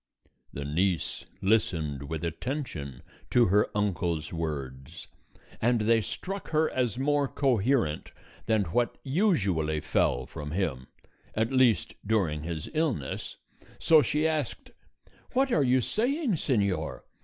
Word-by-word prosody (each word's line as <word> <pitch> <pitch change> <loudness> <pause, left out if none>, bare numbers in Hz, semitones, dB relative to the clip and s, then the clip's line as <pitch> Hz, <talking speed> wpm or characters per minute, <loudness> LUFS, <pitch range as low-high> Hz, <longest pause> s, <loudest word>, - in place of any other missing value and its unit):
The 70 - -5
niece 85 +4 -1 0.2
listened 80 -9 +1
with 80 -1 -4
attention 85 - -4 0.3
to 120 -1 +5
her 105 +2 +3
uncle's 85 -7 -1
words, 70 -5 -5 0.6
and 120 0 +3
they 115 +1 +4
struck 195 - -5
her 155 0 +2
as 125 -4 0
more 145 +1 +2
coherent 125 - +1 0.4
than 110 -2 +3
what 120 +8 0
usually 100 - +1
fell - - +1
from 75 -1 -7
him, 80 -9 -2 0.5
at 110 +3 +1
least 130 -4 +3
during 95 -8 +1
his 80 -1 -4
illness, 155 - -2 0.4
so 160 -2 +6
she 150 +5 +1
asked: 155 -5 -3 0.6
"What 265 +1 +2
are 155 - +3
you 130 0 +3
saying, 255 - 0
señor? 105 - 0
105 Hz, 120 wpm, -28 LUFS, -, 0.6 s, so